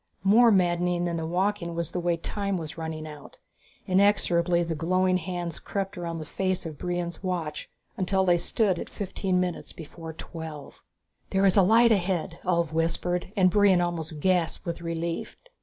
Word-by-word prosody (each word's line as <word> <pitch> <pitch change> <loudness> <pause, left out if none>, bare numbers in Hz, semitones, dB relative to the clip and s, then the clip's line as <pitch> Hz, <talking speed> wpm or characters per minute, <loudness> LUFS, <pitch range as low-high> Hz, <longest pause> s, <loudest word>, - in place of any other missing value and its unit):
More 225 +5 +6
maddening 175 -2 +2
than 170 -1 -1
the 160 -1 -3
walking 180 0 -1
was 170 -2 -3
the 180 - -2
way 175 -1 0
time 200 +3 -2
was 155 -3 -6
running 160 -1 -5
out. 150 -2 -11 0.5
Inexorably 180 -3 +3
the 165 -1 -2
glowing 185 +3 +2
hands 175 -2 -4
crept 195 -1 -3
around 170 -1 -4
the 155 - -6
face 185 +2 -2
of 155 -3 -7
Brion's 175 -1 -3
watch 170 -5 -3 0.3
until 190 0 +1
they 175 -1 +4
stood 190 -2 +1
at - - -6
fifteen 190 -2 -2
minutes 180 -1 -3
before 160 0 -9
twelve. 160 -3 -9 0.5
"There 195 +1 +2
is 190 - +4
a 200 - +7
light 230 +5 +5
ahead," 180 -4 0
Ulv 170 -3 +1
whispered, 175 +3 -1
and 185 -2 +5
Brion 200 -2 +5
almost 165 -3 -2
gasped 180 0 +1
with 170 -1 -4
relief. 165 0 -3
175 Hz, 170 wpm, -27 LUFS, 165-185 Hz, 0.5 s, a